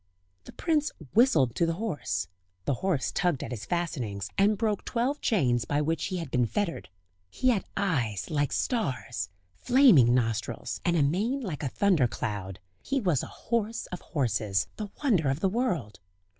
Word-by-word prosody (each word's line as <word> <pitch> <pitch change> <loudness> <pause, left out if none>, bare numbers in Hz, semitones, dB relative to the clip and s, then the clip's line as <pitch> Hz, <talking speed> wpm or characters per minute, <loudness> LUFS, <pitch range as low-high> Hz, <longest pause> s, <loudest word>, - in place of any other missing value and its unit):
The - - -10
prince 310 -3 0 0.2
whistled 160 - +4
to 170 - +1
the 165 - +1
horse; 145 - -2 0.4
the 140 - +1
horse 185 -9 0
tugged 175 -7 0
at - - -6
his 115 -4 -5
fastenings, 125 - -2
and 205 +2 +3
broke 215 -2 0
twelve 255 +5 -1
chains 125 - +2
by 145 +6 0
which 160 +2 0
he 185 - -2
had 165 -6 -5
been 125 -2 +2
fettered. 200 - -2 0.4
He 255 - +1
had 220 -6 +1
eyes 135 - -1
like 145 -3 +1
stars, 130 - -1 0.2
flaming 160 - +5
nostrils, 115 -1 -2
and 175 -1 +2
a 150 - +4
mane 210 - 0
like 175 - -4
a 140 - -1
thunder 175 -6 +3
cloud;... 100 -5 -4 0.2
he 275 0 -1
was 175 - +1
a - - -6
horse 230 0 -2
of 180 - -5
horses, 110 - 0
the 210 -2 -4
wonder 185 - +3
of 135 +2 0
the 195 - +2
world. 185 - -1
165 Hz, 170 wpm, -28 LUFS, -, 0.4 s, flaming